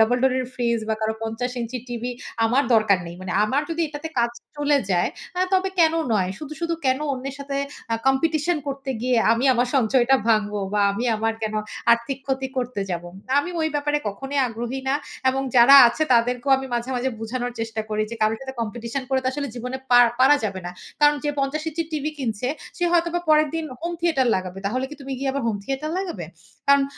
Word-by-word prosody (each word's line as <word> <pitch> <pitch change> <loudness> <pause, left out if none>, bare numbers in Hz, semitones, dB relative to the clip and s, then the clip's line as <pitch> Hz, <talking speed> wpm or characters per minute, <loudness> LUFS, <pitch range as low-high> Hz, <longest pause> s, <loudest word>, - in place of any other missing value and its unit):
double 245 +3 +3
door 265 -1 +4
এর 255 - -3
fridge 235 -2 0
বা 220 - +2
কারো 220 0 0
৫০ 225 +3 -2
ইঞ্চি 235 +2 -4
টিভি 240 +1 -3 0.3
আমার 250 +5 +3
দরকার 215 -4 +4
নেই। 170 - -7
মানে 185 -1 -4
আমার 270 +7 +1
যদি 335 +1 -2
এটাতে 295 +2 -6
কাজ 235 0 +2 0.3
চলে 290 -1 +3
যায় 175 -2 +2 0.3
আ - - +1
তবে 380 0 +3
কেনো 325 0 +4
নয়। 190 -3 +1
শুধু, 305 0 -7
শুধু 335 0 0
কেনো 260 +3 +2
অন্যের 270 +1 -5
সাথে 280 0 -4 0.4
আ - - +3
competition 310 +5 +2
করতে 275 0 -4
গিয়ে 250 -1 +2 0.2
আমি 235 +4 +1
আমার 245 +1 +1
সঞ্চয়টা 250 0 +3 0.2
ভাঙবো 210 -1 +1 0.2
বা 205 - +2
আমি 230 +5 -3
আমার 225 +1 0
কেনো 215 0 -1 0.3
আর্থিক 235 +3 -1
ক্ষতি 265 -1 -1
করতে 245 -4 -2
যাবো। 175 0 -3 0.3
আমি 355 +5 -1
ওই 315 - +1
ব্যাপারে 295 0 +1
কখনোই 270 +7 -4
আগ্রহী 240 +3 -4
না 275 - +2 0.4
এবং 270 +1 -1
যারা 245 +4 +9
আছে 310 - -2
তাদেরকেও 245 +3 +1
আমি 265 - -5
মাঝে, 240 +2 -2
মাঝে 255 +2 0
বুঝানোর 245 +2 -3
চেষ্টা 225 -1 -3
করি 215 0 0
যে 230 - -5
কারো 215 +1 +3
সাথে 265 0 -7
competition 235 +3 -4
করে 265 -1 +1
তো - - -4
আসলে 285 0 -3
জীবনে 250 +2 -4
পার 245 0 +8
পারা 280 +3 +7
যাবে 195 -2 -3
না। - - -4 0.3
"কারণ 295 0 +5
যে 295 - +1
৫০ 275 +3 -1
ইঞ্চি 330 +1 -2
টিভি 305 0 -1
কিনছে 240 -2 -2 0.3
সে 350 - 0
হয়তোবা 345 0 +2
পরের 305 0 +5
দিন 325 -1 -2 0.2
home 340 +1 -3
theater 315 -7 +2
লাগাবে। 185 0 -5
তাহলে 255 +5 -1
কি 300 - -7
তুমি 275 0 -6
গিয়ে 270 0 0
আবার 275 -1 -2
home 205 -3 -2
theater 275 +3 -3
লাগাবে?" 345 - -4 0.4
কারণ 280 0 +6
255 Hz, 210 wpm, -23 LUFS, 230-285 Hz, 0.4 s, যারা